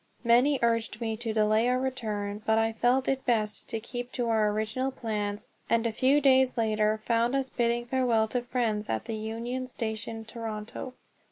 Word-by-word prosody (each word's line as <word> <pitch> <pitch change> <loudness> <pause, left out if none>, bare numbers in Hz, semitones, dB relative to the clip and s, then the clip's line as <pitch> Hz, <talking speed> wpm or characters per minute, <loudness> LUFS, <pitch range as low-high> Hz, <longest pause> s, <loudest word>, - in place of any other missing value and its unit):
Many 250 +5 +4
urged 230 -1 +1
me 225 -2 -2
to 230 0 -3
delay 215 +1 +3
our 250 - +2
return; 215 -6 -3
but 220 +1 +2
I 225 0 +2
felt 245 +4 +2
it 265 -1 0
best 215 -4 0
to 225 - -2
keep 245 +2 -6
to 245 -2 -1
our 220 -2 +3
original 220 +5 -1
plans, 210 -5 -3 0.2
and 230 0 +2
a 230 - +1
few 260 +6 +3
days 265 -2 +4
later 215 -1 +1
found 235 +2 +2
us 270 -1 0
bidding 240 -1 0
farewell 240 -3 +2
to 245 - -1
friends 235 -4 -1
at 110 - -2
the 225 - -4
Union 230 +4 -4
Station, 225 -2 -4
Toronto. 225 +2 -6
230 Hz, 180 wpm, -28 LUFS, 220-250 Hz, 0.2 s, Many